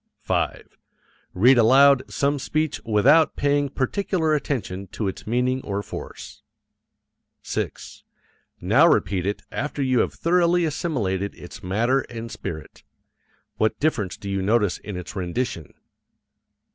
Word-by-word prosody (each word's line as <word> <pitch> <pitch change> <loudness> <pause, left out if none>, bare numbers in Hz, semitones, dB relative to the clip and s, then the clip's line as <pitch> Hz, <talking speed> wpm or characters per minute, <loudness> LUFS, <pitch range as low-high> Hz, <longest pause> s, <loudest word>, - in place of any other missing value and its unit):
5. - - -2 0.6
Read 120 +7 +5
aloud 135 +4 +6
some 140 +1 0
speech 155 +2 -2
without 130 +9 +4
paying 145 0 +1
particular 160 +4 0
attention 100 -10 -3
to 105 +3 -4
its 95 - -6
meaning 125 +3 0
or 100 -2 -3
force. - - -9 1.0
6. - - -5 0.6
Now - - +4
repeat 95 -2 +1
it 100 - -3
after 145 0 -3
you 130 -2 +2
have - - 0
thoroughly 175 0 +2
assimilated 105 - -2
its 90 +4 -11
matter 115 +8 +1
and 115 -1 -7
spirit. 80 -2 -7 0.8
What 110 - 0
difference 115 - -1
do 100 - -9
you 100 -1 -1
notice 105 -1 +1
in 105 -4 -7
its 90 +2 -8
rendition? 90 - -3
120 Hz, 125 wpm, -23 LUFS, 100-145 Hz, 1.0 s, aloud